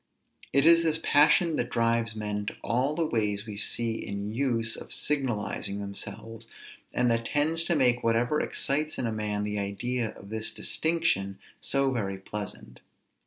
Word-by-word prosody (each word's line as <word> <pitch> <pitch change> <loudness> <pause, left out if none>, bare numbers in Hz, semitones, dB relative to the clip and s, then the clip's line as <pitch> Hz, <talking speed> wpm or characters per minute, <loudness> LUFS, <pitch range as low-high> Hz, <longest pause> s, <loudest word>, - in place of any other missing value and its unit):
It 140 +2 +3
is 165 0 +7
this 160 -1 +1
passion 155 +3 +4
that 120 - -1
drives 115 -1 +1
men 105 -1 -3
to - - -3
all 130 +5 +1
the 165 - +1
ways 105 -6 0
we 105 -2 -7
see 115 +2 0
in 100 +1 -4
use 115 -3 0
of - - -9
signalizing 120 -7 -1
themselves, 110 +3 -6 0.4
and 125 -1 +2
that 115 0 0
tends 160 +3 +2
to 170 - +2
make 125 -4 +3
whatever 120 +6 +2
excites 150 +3 -1
in 125 - -1
a 115 - -1
man 105 -1 -2
the 105 0 -2
idea 110 +4 -2
of 100 - -12
this 110 0 -2
distinction 160 - 0 0.2
so 135 -1 +1
very 100 -6 -2
pleasant. 100 +1 -7
115 Hz, 165 wpm, -28 LUFS, 105-140 Hz, 0.4 s, is